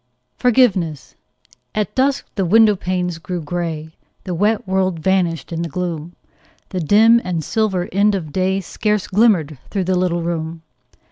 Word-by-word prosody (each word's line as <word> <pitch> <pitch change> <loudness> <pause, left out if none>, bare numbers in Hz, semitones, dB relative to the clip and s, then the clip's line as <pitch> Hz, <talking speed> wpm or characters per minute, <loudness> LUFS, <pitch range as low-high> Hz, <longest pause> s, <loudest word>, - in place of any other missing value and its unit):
FORGIVENESS 195 - +1 0.6
At 210 -3 -1
dusk 270 +1 +1
the 195 - -1
window 215 +3 +5
panes 180 -2 -2
grew 175 +2 -4
grey; 160 -1 -4 0.3
The 185 - -4
wet 210 +4 +1
world 190 -2 0
vanished 170 -1 0
in 165 - -2
the 170 - -3
gloom; 170 0 -4 0.5
The 185 - -3
dim 220 +8 +5
and 170 -3 -2
silver 195 -4 0
end 200 +1 +3
of 160 -6 -5
day 190 +1 0
Scarce 210 +2 -1
glimmered 185 - +2
through 195 -2 -1
the 185 +1 0
little 175 -2 0
room. 165 -1 -4
185 Hz, 150 wpm, -19 LUFS, 165-205 Hz, 0.6 s, window